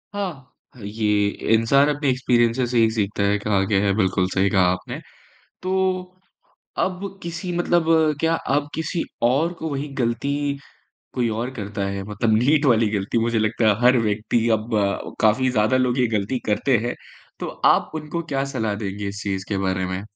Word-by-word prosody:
हाँ। 175 -11 -4 0.4
ये 105 0 +1 0.3
इंसान 140 +6 +4
अपने 145 -1 0
एक्सपीरियंसेज़ 125 -1 +2
से 125 - +1
ही 115 -1 +5
सीखता 105 -2 -1
है 100 +1 +2
कहा 100 -1 +1
गया 100 0 +1
है 100 -1 +2
बिल्कुल 95 -2 +1
सही 100 +1 +2
कहा 95 -3 +3
आपने। 90 0 -5 0.6
तो 185 - -3 1.1
अब 190 +1 -2
किसी 170 +2 -5
मतलब 175 -1 +2 0.4
क्या 165 0 +2 0.2
अब 145 0 -1
किसी 160 +1 -2 0.2
और 140 +8 +2
को 160 - -3
वही 140 +1 -3
गलती, 140 +4 -1 0.6
कोई 125 -2 +1
और 125 +2 -3
करता 105 -3 -4
है 100 0 -4
मतलब 110 +2 0
नीट 145 +6 +3
वाली 115 -4 +4
गलती। 100 +2 -1
मुझे 115 0 +1
लगता 110 +1 +1
है 105 +1 +2
हर 125 +1 +6
व्यक्ति 110 +1 0
अब 110 +2 -6
अ, 100 -1 -1
काफ़ी 120 +4 +3
ज़्यादा 110 +1 +2
लोग 125 0 +1
ये 125 - +3
गलती 105 +5 -1
करते 110 +5 +2
हैं। 120 - -2 0.5
तो - - -3 0.2
आप - - +4
उनको 155 +2 -4
क्या 140 -4 -2
सलाह 110 -4 -1
देंगे 100 -1 -4
इस 100 +1 -6
चीज़ 95 -2 -3
के 100 - -1
बारे 95 -1 -1
में? 95 +1 -4
115 Hz, 180 wpm, -22 LUFS, 105-140 Hz, 1.1 s, हर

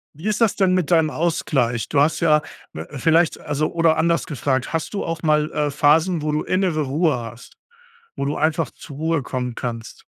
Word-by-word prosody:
Wie 160 +8 -7
ist 215 +2 -1
das 225 -3 +3
denn 185 -2 +2
mit 180 -2 -1
deinem 160 -2 +4
Ausgleich? 135 -8 -1
Du 145 - +1
hast 155 +2 +2
ja 155 -3 +3 0.3
w - - -7
vielleicht, 165 +3 +2
also 150 +1 -2
oder 165 -1 +3
anders 170 +2 +1
gefragt: 135 -4 -1
Hast 165 +4 -3
du 200 - -2
auch 165 0 -4
mal, 150 0 +2
äh, 150 -1 -1
Phasen, 155 +4 +3
wo 150 0 -1
du 150 - -1
innere 185 -4 0
Ruhe 150 +1 +1
hast? 115 0 -10 0.6
Wo 140 - -2
du 145 +2 -2
einfach 155 -2 0
zur 140 -3 -12
Ruhe 160 -1 0
kommen 125 -1 -4
kannst? 115 -2 -6
155 Hz, 200 wpm, -21 LUFS, 140-165 Hz, 0.6 s, deinem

